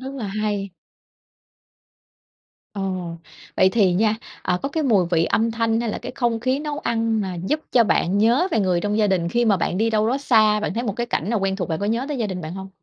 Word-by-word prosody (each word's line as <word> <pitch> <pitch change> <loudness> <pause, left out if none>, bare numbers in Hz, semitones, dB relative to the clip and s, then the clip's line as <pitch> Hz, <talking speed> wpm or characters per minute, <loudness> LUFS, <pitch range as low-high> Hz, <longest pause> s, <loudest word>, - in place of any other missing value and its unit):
Rất 265 +1 -7
là 245 -6 -4
hay. 205 -1 -2 2.0
Ờ. 200 - -3 0.7
Vậy 185 - +5
thì 190 -2 +3
nha, 210 +4 +2 0.3
à, 180 -1 0
có 275 - -1
cái 315 +3 -2
mùi 210 - +3
vị 165 -2 +3
âm 225 +5 +1
thanh, 225 0 0
hay 235 -2 -1
là - - -4
cái - - -7
không 235 -3 0
khí 255 +3 0
nấu 295 0 -4
ăn 225 -4 0
mà 190 -3 -3
giúp 300 +6 0
cho 240 -2 +5
bạn 195 -2 +1
nhớ 240 - +3
về 225 - +1
người 180 -3 +1
trong 210 +3 -1
gia 215 - +3
đình 180 -4 0
khi 240 +7 +1
mà 210 -4 +3
bạn 180 +1 -1
đi 225 +2 +2
đâu 215 0 +2
đó 260 +3 0
xa, 215 -6 +3
bạn 210 - -3
thấy 235 - -1
một 210 -4 -3
cái 240 - -2
cảnh 205 -4 -2
nào 230 -3 0
quen 190 0 0
thuộc, 180 -4 -3
bạn 160 - -2
có 200 - -1
nhớ 230 +4 0
tới 290 -3 -3
gia 225 - 0
đình 185 -2 -5
bạn 160 +1 -6
hông? 190 0 -7
215 Hz, 255 wpm, -22 LUFS, 195-235 Hz, 2.0 s, Vậy